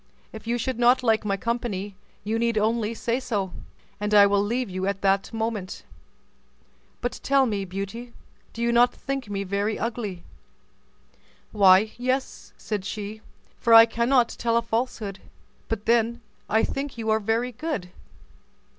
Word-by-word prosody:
If 220 0 -10
you 240 +1 +1
should 240 +1 -3
not 245 +1 +4
like 225 -2 +2
my 195 -1 0
company, 210 -2 -3 0.3
you 220 +2 -1
need 230 -1 +1
only 225 +1 0
say 235 +2 -1
so, 205 -8 -3 0.5
and 210 +1 0
I 205 -1 +9
will 200 0 +3
leave 240 +5 -1
you 190 +1 -1
that 195 0 0
moment. 220 -4 -4 1.2
But 245 - -3
tell 275 -1 +3
me, 205 -5 -2
Beauty, 200 +6 -6 0.4
do 230 - -5
you 235 - +2
not 240 +1 +4
think 270 -5 -4
me 200 -1 -2
very 200 +3 -1
ugly?" 215 -6 -4 1.3
"Why, 200 +1 +5
yes," 255 +2 -2
said 210 -3 -4
she, 210 +1 -6 0.4
"for 230 -1 +5
I 225 0 +11
cannot 235 +2 +2
tell 230 0 0
a 235 - +1
falsehood; 225 -4 -3 0.5
but 220 -2 -3
then 235 +1 +2 0.3
I 220 +1 +3
think 275 -2 -3
you 220 -1 -1
are 220 - +3
very 225 +4 0
good." 235 - -4
225 Hz, 155 wpm, -25 LUFS, 200-240 Hz, 1.3 s, I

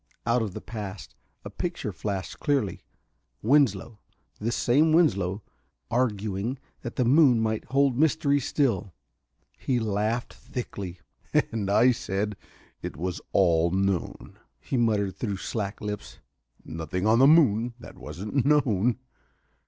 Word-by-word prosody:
Out 120 +1 +2
of 105 -4 -4
the - - -5
past 105 -3 -7 0.3
a - - -6
picture - - -3
flashed 100 -3 -4
clearly: 135 - 0 0.6
Winslow 115 -4 +2 0.4
this 115 +3 -1
same 150 +6 +3
Winslow 100 - +2 0.5
arguing 110 0 -1 0.2
that 120 - -6
the 125 - +1
moon 130 -2 +5
might 110 -1 -1
hold 135 0 +2
mysteries 145 -1 +2
still. 105 - 0 0.6
He 125 -2 0
laughed 110 +2 -1
thickly. 95 -7 -7 0.5
"And 105 -4 -2
I 120 +5 +5
said 105 -2 -2 0.5
it - - -6
was 90 +2 -3
all 85 -3 +3
known," 95 0 -2 0.2
he 80 - -4
muttered 105 -5 +1
through 100 -5 -2
slack 100 +1 -4
lips. 105 -1 -6 0.5
"Nothing 80 +4 -4
on 110 +2 +4
the 135 - +7
moon 120 -7 +4
that - - -12
wasn't 105 +8 -3
known...." 125 -6 +2
110 Hz, 130 wpm, -26 LUFS, 100-125 Hz, 0.6 s, the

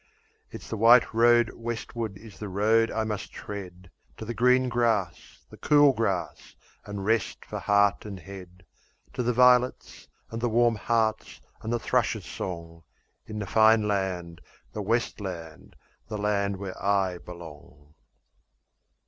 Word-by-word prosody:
It's - - -10
the 110 - -4
white 120 +1 +6
road 120 +1 +4
westwards 115 -2 -5
is 110 0 -14
the 105 - -6
road 110 +4 +2
I 110 - -1
must 105 -2 -4
tread 90 -3 -9 0.3
To 110 - -7
the 120 - -4
green 125 +3 +3
grass, 115 -5 -1
the - - -12
cool 145 -2 +5
grass, 100 -7 -3 0.3
and 100 -1 -5
rest 110 -2 -1
for - - -6
heart 100 0 +2
and 100 -3 -8
head, 90 -1 -12 0.5
To - - -2
the 125 0 +1
violets, 125 +1 +2 0.2
and 115 0 -5
the 120 - +1
warm 120 +1 +3
hearts, 110 0 -1 0.2
and 110 - -4
the 120 - +1
thrushes' - - 0
song, 85 -2 -7 0.5
In 110 - -6
the 105 - -3
fine 110 +2 +4
land, 90 -4 -2 0.3
the 105 - -4
west 115 +4 -1
land, 85 -5 -8 0.3
the 105 - -5
land 100 -1 0
where 95 -1 -7
I 95 -3 +1
belong. 75 -4 -13
105 Hz, 150 wpm, -27 LUFS, 95-115 Hz, 0.5 s, white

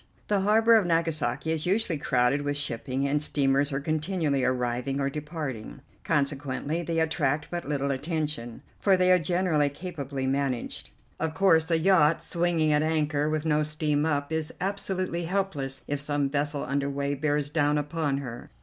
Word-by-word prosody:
The 205 -1 +3
harbor 220 +4 +4
of 200 -5 +1
Nagasaki 160 -4 +1
is 160 +1 -2
usually 190 -5 +1
crowded 125 +2 +2
with 145 0 -1
shipping, 130 0 -2
and 145 +1 +1
steamers 140 -1 +1
are 135 - -1
continually 155 -2 0
arriving 125 +1 -1
or 140 0 0
departing, 150 -5 -6 0.2
consequently 145 +1 -1
they 165 -1 -1
attract 155 -2 0
but 175 -4 -4
little 140 -1 0
attention, 145 -4 -3 0.2
for 195 -2 +4
they 185 0 +4
are 180 - +6
generally 165 -3 +1
capably 140 -4 -5
managed. 135 - -2 0.3
Of 160 0 -2
course 160 -3 +4
a 165 - +3
yacht 165 -2 +4
swinging 170 -3 +1
at 150 - +3
anchor 150 -2 +1
with 155 0 -1
no 150 -1 +2
steam 150 -1 0
up 145 -1 -1
is 160 -1 -1
absolutely 185 -3 -2
helpless 165 -8 -2
if 145 0 -2
some 145 -1 -1
vessel 145 0 -1
under 140 +1 -1
way 140 0 -1
bears 145 0 -1
down 150 -1 +2
upon 150 -1 -1
her. 125 -3 -7
150 Hz, 165 wpm, -27 LUFS, 140-165 Hz, 0.3 s, are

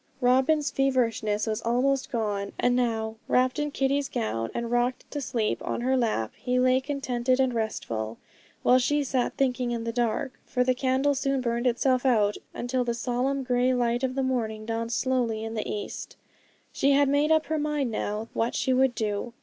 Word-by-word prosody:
Robin's 265 +4 +3
feverishness 230 -6 +1
was 215 -1 -2
almost 260 +4 +1
gone; 205 -4 -2
and 245 0 +3
now, 225 -3 -1
wrapped 255 +2 +2
in 295 0 0
Kitty's 275 0 0
gown 115 - -2
and 235 0 -4
rocked 245 +1 0
to 290 - -3
sleep 235 -5 -1
on - - -2
her 260 +2 +2
lap, 220 - 0
he 250 0 -1
lay 255 +1 +4
contented 260 -2 -1
and 260 -2 +2
restful, 115 - -3 0.5
while 255 +1 +5
she 290 +3 +1
sat 255 -2 -1
thinking 255 -2 +1
in 235 -1 -2
the 230 - -2
dark, 240 +2 -1
for 250 - 0
the 255 0 +2
candle 265 +2 +1
soon 275 0 0
burned 240 0 0
itself 250 +1 +2
out, 215 -6 +3 0.2
until 250 +1 -1
the 235 -1 -1
solemn 255 +3 -1
grey 250 0 +2
light 240 0 +1
of 260 -1 -1
the 270 - 0
morning 220 -4 -2
dawned 230 +1 -3
slowly 240 -3 0
in 225 0 -4
the 215 -2 -3
east. 205 - -6 0.6
She 280 +1 +3
had 285 0 +4
made 290 +3 +2
up 315 0 +4
her 315 0 -1
mind 295 -4 -1
now 215 0 -3
what 230 +1 -1
she 260 - +1
would 260 -1 +3
do. 215 +1 -2
250 Hz, 190 wpm, -27 LUFS, 230-265 Hz, 0.6 s, while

